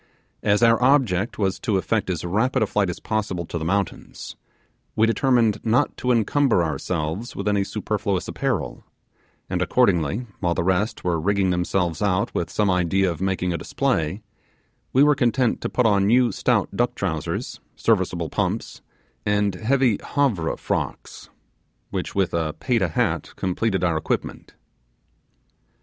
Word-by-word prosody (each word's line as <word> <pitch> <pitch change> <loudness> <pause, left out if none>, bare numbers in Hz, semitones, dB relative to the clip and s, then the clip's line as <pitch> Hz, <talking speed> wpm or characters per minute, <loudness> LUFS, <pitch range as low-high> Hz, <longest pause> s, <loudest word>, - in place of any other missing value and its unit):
As 105 +2 +2
our 115 +1 +5
object 125 -7 +2
was 95 -3 0
to 105 -5 0
effect 100 +1 -1
as 90 -2 -2
rapid 110 +7 +1
a - - +2
flight 105 -2 0
as 90 - -5
possible 105 -6 -2
to 85 - -4
the - - -4
mountains, 100 +3 -3 0.6
we 110 - +4
determined 115 -2 +2
not 120 +5 +2
to 125 - 0
encumber 120 -3 +2
ourselves 80 - -3
with - - -4
any 100 -1 +2
superfluous 105 -2 -2
apparel; - - -2 0.6
and - - -2
accordingly, 90 - +2
while 85 -2 0
the - - 0
rest 95 +4 0
were 85 -3 0
rigging 100 +1 +1
themselves 90 -2 -1
out 100 -1 +1
with 85 - -2
some 105 - 0
idea 90 0 +2
of 85 - -7
making 95 -2 0
a 85 - -3
display, 80 +8 -1 0.7
we 135 - +5
were 150 0 +5
content 125 -2 +1
to - - -2
put 125 - +1
on 100 -3 +3
new 120 +1 +4
stout - - +1
duck - - 0
trousers, - - -3 0.2
serviceable - - 0
pumps, - - -2 0.4
and 105 -1 +1
heavy 120 +2 +1 0.2
Havre 115 - +1
frocks, - - -4 0.6
which - - -4
with 95 -2 +1
a 80 -2 -1
Payta 115 -8 +1
hat 80 - -1
completed 95 +1 -1
our 85 -2 +2
equipment. 80 - -4
100 Hz, 150 wpm, -23 LUFS, 90-115 Hz, 0.7 s, our